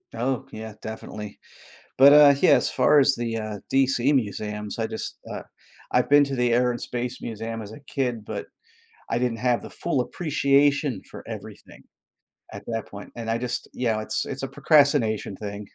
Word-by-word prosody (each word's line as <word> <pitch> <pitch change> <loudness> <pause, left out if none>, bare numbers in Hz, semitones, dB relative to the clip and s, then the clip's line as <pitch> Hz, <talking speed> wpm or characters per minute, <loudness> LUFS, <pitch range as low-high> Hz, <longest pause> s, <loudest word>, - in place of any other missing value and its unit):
Oh, 130 +1 -1
yeah, 110 0 -7
definitely 105 -1 -8 0.6
but, 140 +2 +8
uh, 145 -1 +8
yeah, - - +5
as - - +4
far 150 - +4
as 135 - +3
the, 115 -1 -2
uh, 110 -1 -5
DC 135 0 +3
Museums, 105 -3 -2
I 115 - 0
just, 110 0 -6
uh - - -5 0.5
I've - - +2
been 145 0 +7
to 140 -1 -4
the 125 -1 +2
Air 125 +1 +3
and 120 - -4
Space 125 +1 -4
Museum 115 0 -5
as 105 - -9
a 130 - -11
kid, 125 -6 -2
but - - -4 0.7
I 115 - +1
didn't 120 -2 0
have 125 0 +1
the - - -8
full 155 -6 -1
appreciation 140 - +1
for - - -9
everything - - -10 0.7
at - - -8
that 115 -2 -3
point, 100 0 -10
and 115 -1 -4
I 115 - +1
just 125 0 -4
yeah, 115 -3 +2
it’s - - -3
it's 135 - -6
a 135 - -2
procrastination 140 - +3
thing. 100 -1 -6
120 Hz, 185 wpm, -25 LUFS, 110-135 Hz, 0.7 s, but